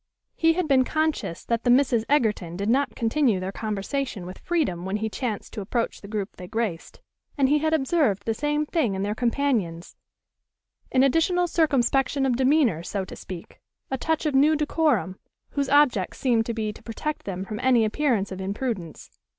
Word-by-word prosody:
He 325 0 +3
had 360 -1 -1
been 265 -3 +4
conscious 310 - -2
that 235 -1 -1
the 245 - +1
Misses 245 -3 +4
Egerton 210 - +1
did 200 +2 -2
not 275 +4 +1
continue 230 -3 +1
their 185 +1 -4
conversation 215 +1 -3
with 185 +1 -9
freedom 295 - -1
when 190 +2 -2
he 220 +1 -2
chanced 225 -5 -4
to 210 - -4
approach 230 +4 -2
the 200 - -10
group 205 -1 -4
they 180 - -8
graced; 215 -6 -4 0.4
and 275 -2 +4
he 295 +2 +3
had 315 +1 0
observed 270 - +1
the 225 - +1
same 295 +5 0
thing 290 - 0
in 190 - -2
their 205 +1 -1
companions, 230 -8 -1 1.0
an 260 0 +4
additional 330 +6 +3
circumspection 275 -4 +2
of 255 -2 +2
demeanor, 260 - +3
so 195 +2 -3
to - - -9
speak, 180 -3 -10 0.3
a 265 - 0
touch 320 +4 -1
of 300 - +1
new 290 +4 +5
decorum, 300 - 0 0.3
whose 280 -1 -1
object 265 -10 +3
seemed 235 -4 +1
to 235 - -1
be 215 -2 -2
to - - -15
protect 300 +7 -5
them 190 -1 -4
from 210 +1 -5
any 250 -3 +4
appearance 215 -4 0
of 190 0 -5
imprudence. 195 - -4
240 Hz, 185 wpm, -25 LUFS, 200-290 Hz, 1.0 s, new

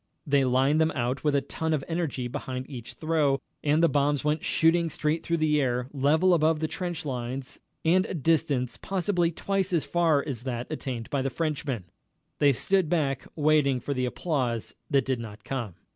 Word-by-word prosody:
They 140 -2 +3
lined 135 +4 +3
them 160 - +3
out 125 +1 -1
with 150 -2 +2
a 140 - +3
ton 160 +2 -2
of 140 - -3
energy 165 -7 -2
behind 130 0 -5
each 120 -3 -8
throw, 150 0 +1 0.3
and 150 +2 +3
the - - +7
bombs 145 -2 +1
went 150 +1 0
shooting 165 +1 +3
straight 155 +1 0
through 170 - 0
the 150 -2 +2
air, 125 -1 -1
level 155 +6 +3
above 160 -1 +3
the 155 - 0
trench 175 0 -4
lines, 130 0 -4 0.3
and 185 +3 +4
a - - -4
distance 145 -5 +1
possibly 180 -2 0
twice 190 +3 -1
as 170 -4 +1
far 165 -5 +2
as 125 -6 -4
that 120 -2 -3
attained 125 -7 -4
by 140 - +1
the 135 - 0
Frenchmen. 145 - -2 0.6
They 145 -1 +5
stood 185 +6 +1
back 140 -6 0
waiting 150 -4 +3
for 140 - -3
the 130 -1 0
applause 125 -6 -2 0.2
that 140 -4 +2
did 130 -2 -1
not 105 -2 -8
come. 120 -9 -4
145 Hz, 190 wpm, -27 LUFS, 130-160 Hz, 0.6 s, the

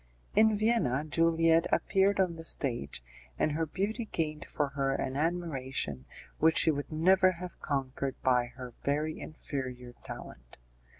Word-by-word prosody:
In 215 0 +5
Vienna, 205 - +2
Juliette 165 +1 +3
appeared 195 0 +2
on 180 -3 +2
the 165 - -8
stage, 115 - -1 0.3
and 155 - +1
her 160 +2 -1
beauty 205 - -2
gained 155 -6 -3
for 145 -2 -1
her 135 -1 0
an 130 0 -2
admiration 135 - -2 0.3
which 160 +1 +4
she 160 - +5
would 145 0 -4
never 185 +4 +4
have 180 0 -8
conquered 135 -1 -3
by 125 -2 +3
her 125 -2 -8
very 150 +2 -1
inferior 130 -5 -6
talent. - - -10
155 Hz, 140 wpm, -30 LUFS, 130-170 Hz, 0.3 s, In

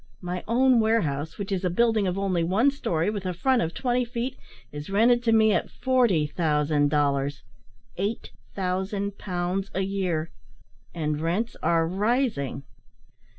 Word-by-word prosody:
My 180 0 -4
own 250 +2 +4
warehouse, 160 -9 0
which 200 -1 -5
is 190 -1 -1
a 180 - +1
building 220 +2 +2
of 180 +1 -1
only 190 -4 0
one 210 +11 +3
storey, 175 - -1
with 205 -3 -4
a 180 -2 -3
front 255 +6 +2
of 165 - -2
twenty 250 -1 0
feet, 245 +2 -4 0.4
is 145 +2 -7
rented 235 +4 +4
to 225 - +3
me 220 -1 +5
at - - 0
40,000 155 - +1
dollars 140 -1 0 0.5
8000 190 - -3
pounds 185 +1 -2
a 190 - +1
year 185 -5 -2 0.6
and 150 -2 -2
rents 185 +9 -1
are 165 -1 +2
rising." 200 - -1
190 Hz, 145 wpm, -26 LUFS, 165-225 Hz, 0.6 s, me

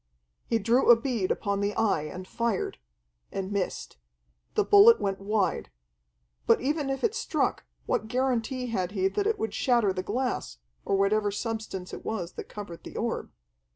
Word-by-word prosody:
He 230 - +2
drew 230 +5 +2
a 240 - +11
bead 230 -5 -1
upon 200 0 -1
the 200 +1 -1
Eye 220 -8 +2
and 185 +4 -7
fired 235 -3 -2 0.5
and 195 0 -4
missed. 200 - -3 0.6
The - - +4
bullet 420 +3 +7
went 195 -1 -1
wide. 200 - 0 0.8
But - - +5
even 290 +2 -1
if 270 0 -3
it 450 - +2
struck, 465 - -1 0.2
what 220 - -1
guarantee 255 0 0
had 185 -3 -1
he 190 -2 +2
that 410 - -1
it 440 - +1
would 220 -2 -3
shatter 235 -6 +2
the 185 - -2
glass, 245 - -2 0.3
or 195 - +1
whatever 205 +2 +2
substance 210 -3 -4
it - - -7
was 185 -6 -3
that - - -8
covered 200 -5 -8
the - - -8
orb? - - -2
220 Hz, 170 wpm, -28 LUFS, 195-250 Hz, 0.8 s, a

